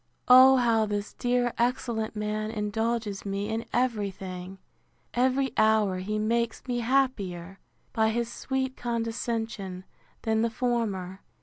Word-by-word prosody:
O 260 +1 +9
how 230 -3 +3
this 205 0 -3
dear 245 -1 0
excellent 235 -2 -1
man 210 0 -2
indulges 220 -1 -2
me 200 +1 -3
in 225 +1 -2
every 230 -5 +1
thing! 185 0 -8 0.6
Every 260 +2 +2
hour 215 -4 +3
he 210 +3 -2
makes 230 +2 -1
me 245 -2 -1
happier, 205 -8 -1 0.3
by 220 -1 +3
his 235 +1 -2
sweet 265 0 -2
condescension, 225 -5 -3 0.4
than 220 0 +1
the 230 - +2
former. 215 -6 -2
225 Hz, 125 wpm, -27 LUFS, 205-240 Hz, 0.6 s, O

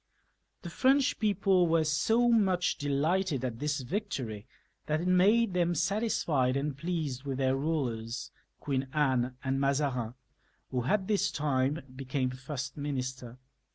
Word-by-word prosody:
The 170 - -6
French 270 +7 +3
people 195 -4 +3
were 165 -1 +3
so 220 +11 +2
much 190 -6 +2
delighted 145 +1 0
at 115 -2 -4
this 145 0 -1
victory 130 - -4 0.4
that 155 +1 +1
it 180 - -2
made 200 +4 +4
them 175 -1 +1
satisfied 155 - +1
and 140 0 -2
pleased 150 -4 -3
with 135 -2 -3
their 130 -1 +2
rulers, 125 -5 -2 0.3
Queen 135 -2 -2
Amie 130 -4 +2
and 135 0 0
Mazarin, 135 -4 0 0.6
who 125 -2 -1
at 195 +6 +1
this 200 -1 +1
time 140 0 0
became 130 -1 -2
first 130 +1 -6
minister. 130 -4 -4
145 Hz, 135 wpm, -30 LUFS, 130-180 Hz, 0.6 s, made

